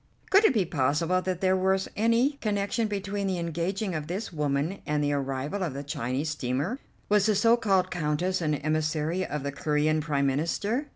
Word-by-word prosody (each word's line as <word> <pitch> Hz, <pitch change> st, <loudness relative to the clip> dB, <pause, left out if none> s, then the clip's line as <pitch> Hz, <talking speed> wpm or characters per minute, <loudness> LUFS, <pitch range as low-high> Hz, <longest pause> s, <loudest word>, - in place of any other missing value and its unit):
Could 400 Hz, +3 st, +6 dB
it 295 Hz, -, +5 dB
be 200 Hz, -4 st, +3 dB
possible 160 Hz, +4 st, +1 dB
that 185 Hz, -1 st, -3 dB
there 190 Hz, 0 st, +3 dB
was 190 Hz, +1 st, +1 dB
any 230 Hz, +5 st, +3 dB
connection 210 Hz, +1 st, 0 dB
between 200 Hz, -1 st, -3 dB
the 185 Hz, -1 st, -1 dB
engaging 175 Hz, +4 st, -2 dB
of 155 Hz, -2 st, -4 dB
this 190 Hz, +3 st, -4 dB
woman 150 Hz, +4 st, -1 dB
and 150 Hz, 0 st, 0 dB
the 145 Hz, 0 st, +1 dB
arrival 140 Hz, +6 st, -2 dB
of 165 Hz, -7 st, -2 dB
the 140 Hz, -, -4 dB
Chinese 135 Hz, +2 st, -2 dB
steamer? 145 Hz, -, -2 dB, 0.3 s
Was 210 Hz, 0 st, +3 dB
the 215 Hz, -, +3 dB
so 230 Hz, +4 st, +5 dB
called 195 Hz, -6 st, +1 dB
Countess 175 Hz, +3 st, -1 dB
an 155 Hz, -2 st, +1 dB
emissary 155 Hz, +3 st, -1 dB
of 150 Hz, -5 st, -4 dB
the 140 Hz, -, -2 dB
Corean 150 Hz, +2 st, +1 dB
Prime 145 Hz, -2 st, 0 dB
Minister? 185 Hz, -, 0 dB
170 Hz, 185 wpm, -27 LUFS, 150-200 Hz, 0.3 s, Could